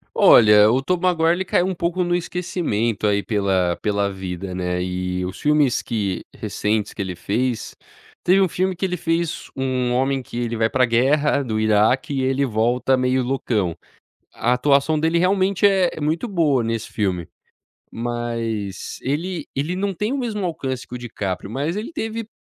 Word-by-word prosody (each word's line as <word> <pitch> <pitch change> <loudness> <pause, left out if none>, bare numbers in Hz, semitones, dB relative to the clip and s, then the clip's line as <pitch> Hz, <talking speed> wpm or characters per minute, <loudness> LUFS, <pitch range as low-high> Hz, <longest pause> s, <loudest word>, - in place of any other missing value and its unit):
Olha, 105 -1 +7
o 130 +3 +2
Tobey 180 +4 0
Maguire 165 -1 +2
ele 185 +2 -1
caiu 180 - +2
um 190 - -1
pouco 175 +1 -1
no 175 0 0
esquecimento, 165 - -1
aí 100 0 +1
pela 95 -5 +1
pela 100 -1 0
vida, 95 0 -6
né. 90 0 -2
Eh, 90 0 -2
os 95 +1 -6
filmes 150 -4 +2
que 100 -5 -3
recentes 105 0 -1
que - - -5
ele 95 -2 -4
fez 115 +6 -2 0.4
teve 190 +2 +4
um 190 - +3
filme 185 +1 -1
que 185 - -7
ele 180 -1 -2
fez 165 0 -2
um 130 -2 -1
homem 135 +1 +1
que 120 - -9
ele 120 -1 -2
vai 110 0 +2
pra 130 -1 +2
guerra 140 +5 +2
do 110 -3 -2
Iraque 110 +8 +2
e 135 -1 0
ele 135 +1 +1
volta 120 +3 +1
meio 130 0 +1
loucão 110 -9 -1 0.6
a 120 - +1
atuação 140 +4 +2
dele 165 +2 +2
realmente 190 +2 +3
é 190 -4 +2
muito 160 +9 -1
boa 155 - +2
nesse 115 -1 -3
filme, 90 -5 -1 0.7
mas 115 -4 -4
ele 165 +6 -3
ele 150 +6 -1
não 200 +2 -1
tem 210 +8 -2
o 280 - -1
mesmo 210 -6 -2
alcance 135 -7 -4
que - - -12
o - - -3
DiCaprio, 100 -5 -4
mas 145 +8 -2
ele 215 +8 -4
teve 225 -7 -4
130 Hz, 175 wpm, -21 LUFS, 105-170 Hz, 0.7 s, Olha